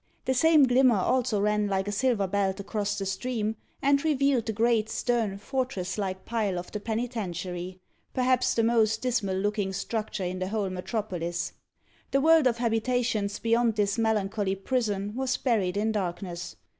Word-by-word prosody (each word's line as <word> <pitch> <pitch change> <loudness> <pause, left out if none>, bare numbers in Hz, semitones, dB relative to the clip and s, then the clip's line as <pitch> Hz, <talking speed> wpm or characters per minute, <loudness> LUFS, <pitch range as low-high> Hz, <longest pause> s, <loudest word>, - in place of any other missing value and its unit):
The 260 - +2
same 310 +3 +5
glimmer 255 -2 +5
also 240 +2 +1
ran 210 0 +1
like 195 0 -1
a - - -1
silver 215 -1 +1
belt 195 0 0
across 205 0 -2
the 195 - -3
stream, 220 +2 -2 0.3
and 280 0 +3
revealed 275 -6 +2
the - - +1
great, 220 0 +2
stern, 225 -6 0
fortress 250 -4 -3
like 190 -2 -3
pile 215 -5 -1
of 175 - -6
the 210 - -3
Penitentiary 190 -6 -4 0.3
perhaps 255 0 +2
the 230 - +2
most 225 -1 +2
dismal 220 -7 0
looking 205 0 -1
structure 215 0 -3
in 185 +1 -3
the 185 - -2
whole 200 -2 -1
metropolis. 180 -3 -3 0.6
The 275 +1 +2
world 320 -2 +6
of 235 -2 +1
habitations 225 -3 0
beyond 230 0 +2
this 205 +1 0
melancholy 205 -3 0
prison 205 -2 -1
was 265 0 0
buried 200 -7 0
in 220 +2 +1
darkness. 180 -3 -4
215 Hz, 160 wpm, -27 LUFS, 195-245 Hz, 0.6 s, world